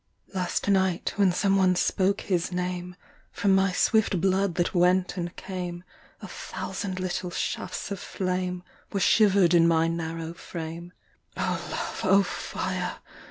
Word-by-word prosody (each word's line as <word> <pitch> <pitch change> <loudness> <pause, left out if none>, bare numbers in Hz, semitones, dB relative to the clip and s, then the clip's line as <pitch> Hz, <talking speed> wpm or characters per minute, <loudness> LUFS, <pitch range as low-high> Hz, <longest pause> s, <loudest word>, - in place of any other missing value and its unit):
Last 185 0 -1
night, 190 -3 +2
when 200 -3 +4
some 195 +2 +2
one 185 -1 +4
spoke 195 +3 +1
his 180 -2 -1
name, 180 0 -3 0.4
From 200 -1 +2
my 190 0 +3
swift 200 0 +2
blood 190 0 +1
that 175 0 0
went 180 0 +3
and 175 -2 -4
came 180 -2 -5 0.4
A - - -5
thousand 190 -3 -5
little 185 0 -2
shafts 185 +2 -3
of 200 - -3
flame. 180 -1 -2 0.3
Were 200 - -1
shiver’d 195 -3 +4
in 170 -1 +6
my 165 -1 +3
narrow 165 0 -3
frame 170 0 -7 0.5
O - - -1
Love, - - -4
O 195 +1 +5
fire! - - -3
180 Hz, 145 wpm, -27 LUFS, 175-190 Hz, 0.5 s, in